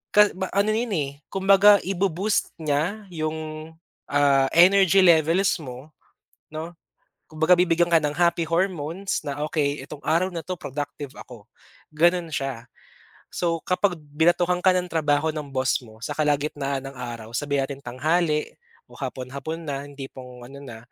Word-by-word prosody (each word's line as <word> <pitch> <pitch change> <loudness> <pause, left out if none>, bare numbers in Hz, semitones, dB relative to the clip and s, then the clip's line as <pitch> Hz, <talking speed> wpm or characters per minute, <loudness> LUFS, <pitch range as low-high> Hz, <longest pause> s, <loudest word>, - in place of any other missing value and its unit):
Ka 210 0 +7
ba 190 0 -4
ano 200 +2 +3
'yon, 225 0 -1
eh, 140 -3 -1 0.2
kumbaga 195 +1 +5
ibo-boost 195 +2 -1
niya 155 +9 -1
yung, 155 0 -5 0.4
ah, 140 -2 +3
energy 190 +2 +6
levels 170 +2 +4
mo, 130 +1 -10 0.6
'no, 160 +2 -6 0.5
kumbaga 160 +3 +3
bibigyan 175 -1 +2
ka 170 - +5
ng 150 -2 0
happy 170 +1 +2
hormones 170 +1 -2
na, 145 0 -4
"Okey, 145 -2 -1
itong 145 -1 -11
araw 170 +4 +2
na 170 -3 -6
'to, 185 - -3
productive 145 -3 -6
ako", 115 -5 -12 0.4
gano'n 170 +2 +2
siya. 135 -5 -4 0.6
So, 170 -1 -1
kapag 180 -2 +1
binatuhan 175 +4 +1
ka 190 - +6
ng 180 0 0
trabaho 155 -1 +1
ng 150 -2 -6
boss 130 +2 +1
mo, 110 -1 -15
sa - - -5
kalagitnaan 145 -2 -1
ng 135 - -10
araw, 120 -3 -7
sabihin 140 0 0
natin 140 0 -7
tanghali, 150 +5 0 0.4
o - - -14
hapon-hapon 140 +5 -5
na 145 -2 -5
yung 145 - -14
tipong 130 -2 -10
ano 135 +3 -11
na 125 -5 -9
155 Hz, 150 wpm, -24 LUFS, 140-175 Hz, 0.6 s, Ka